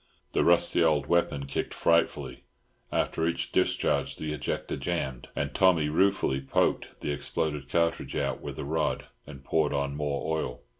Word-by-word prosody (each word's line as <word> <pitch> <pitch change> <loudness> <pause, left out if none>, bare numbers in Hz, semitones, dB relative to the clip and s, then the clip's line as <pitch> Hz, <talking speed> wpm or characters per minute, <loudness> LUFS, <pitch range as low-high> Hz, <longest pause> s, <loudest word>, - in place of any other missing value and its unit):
The - - +3
rusty 85 0 +4
old 75 -4 +3
weapon 75 -4 +1
kicked 70 - -3
frightfully, 85 0 +1 0.5
after 80 - 0
each 85 - -1
discharge 70 -1 +1
the 75 -1 -4
ejector 75 - -3
jammed, 65 -2 -3
and 70 -1 -2
Tommy 85 -6 +4
ruefully 80 -5 +2
poked 65 - 0
the - - -2
exploded 75 0 -2
cartridge 85 +1 0
out - - -1
with - - -6
a - - -4
rod 80 +2 -1 0.2
and 70 -2 -10
poured 75 +1 +1
on 70 0 -1
more 75 +2 -1
oil. 65 -4 -4
75 Hz, 155 wpm, -28 LUFS, 70-80 Hz, 0.5 s, rusty